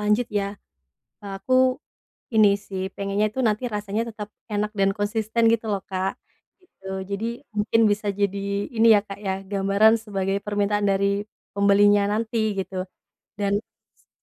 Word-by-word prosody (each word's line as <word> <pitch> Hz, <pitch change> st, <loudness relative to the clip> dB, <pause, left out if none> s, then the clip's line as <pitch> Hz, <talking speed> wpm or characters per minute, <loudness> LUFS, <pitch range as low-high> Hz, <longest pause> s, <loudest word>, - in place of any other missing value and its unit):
lanjut, 210 Hz, +3 st, +2 dB
ya, 200 Hz, -1 st, -1 dB, 0.7 s
eee, 200 Hz, -, -6 dB
aku 255 Hz, +6 st, -1 dB, 0.8 s
ini 215 Hz, -2 st, +7 dB, 0.2 s
sih, 190 Hz, -1 st, -4 dB
pengennya 200 Hz, +1 st, 0 dB
itu 260 Hz, -, -6 dB
nanti 215 Hz, +3 st, 0 dB
rasanya 205 Hz, +1 st, -2 dB
tetap 210 Hz, -1 st, -7 dB, 0.3 s
enak 210 Hz, +1 st, 0 dB
dan 195 Hz, 0 st, +4 dB
konsisten, 220 Hz, +2 st, 0 dB
gitu 230 Hz, 0 st, -1 dB
loh, 200 Hz, -1 st, -1 dB
Kak. 190 Hz, 0 st, -2 dB, 0.4 s
Gitu. 360 Hz, -, -25 dB, 0.3 s
Jadi, 200 Hz, +3 st, -2 dB, 0.3 s
mungkin 210 Hz, +2 st, +2 dB
bisa 205 Hz, +1 st, -1 dB
jadi 200 Hz, 0 st, -1 dB, 0.4 s
ini, 230 Hz, +1 st, +5 dB
ya 205 Hz, -, +5 dB
Kak, 195 Hz, 0 st, -8 dB
ya, 190 Hz, -, +1 dB, 0.2 s
gambaran 200 Hz, +2 st, +4 dB
sebagai 195 Hz, -1 st, -1 dB
permintaan 205 Hz, 0 st, 0 dB
dari 200 Hz, +1 st, +1 dB, 0.3 s
pembelinya 205 Hz, 0 st, +5 dB
nanti, 225 Hz, +2 st, -1 dB, 0.2 s
gitu. 185 Hz, -1 st, -3 dB, 0.6 s
Dan, 200 Hz, -1 st, +1 dB, 0.4 s
s -, -, -34 dB
205 Hz, 150 wpm, -24 LUFS, 200-215 Hz, 0.8 s, ini